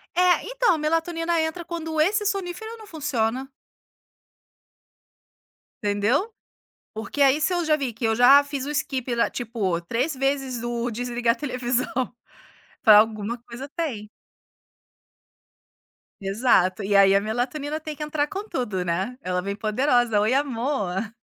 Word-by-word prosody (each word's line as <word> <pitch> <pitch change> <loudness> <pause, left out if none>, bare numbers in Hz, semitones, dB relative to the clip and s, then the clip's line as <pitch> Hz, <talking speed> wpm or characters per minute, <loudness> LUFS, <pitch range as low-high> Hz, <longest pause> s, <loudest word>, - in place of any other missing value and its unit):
É, 360 0 +4
então, - - +2
a - - -1
melatonina 330 +2 0
entra 320 +2 -3
quando 325 -2 -4
esse 415 +6 +2
sonífero 400 +3 -3
não 440 - -12
funciona. 270 - -2 2.3
Entendeu? 210 - +1 0.6
Porque 225 +6 -4
aí, 275 +2 +5
se 320 - +1
eu 350 -1 0
já 310 -1 +4
vi 275 -5 -3
que 225 +1 -4
eu 225 0 +2
já 270 +4 +7
fiz 285 -2 -5
o - - -3
skip 260 -4 -2
lá, 235 - +2
tipo, 215 -8 -2
3 250 - -2
vezes 270 -2 -1
o 240 0 -2
desligar 240 0 0
televisão, 250 -2 -2 0.9
falo: 215 -3 +9
"Alguma 220 +1 0
coisa 240 +3 -9
tem". 265 -11 -4 2.1
Exato. 195 -2 +2
E 200 +1 0
aí 195 0 +6
a 200 - +5
melatonina 255 +8 -3
tem 310 -1 -6
que 300 - -6
entrar 300 -1 -1
com 405 +4 -6
tudo, 210 - -2
né, 190 +9 -2
ela 180 0 -1
vem 200 +2 -4
poderosa: 235 0 +2
"Oi 225 +5 +2
amor". 230 -7 -1
255 Hz, 140 wpm, -24 LUFS, 220-310 Hz, 2.3 s, falo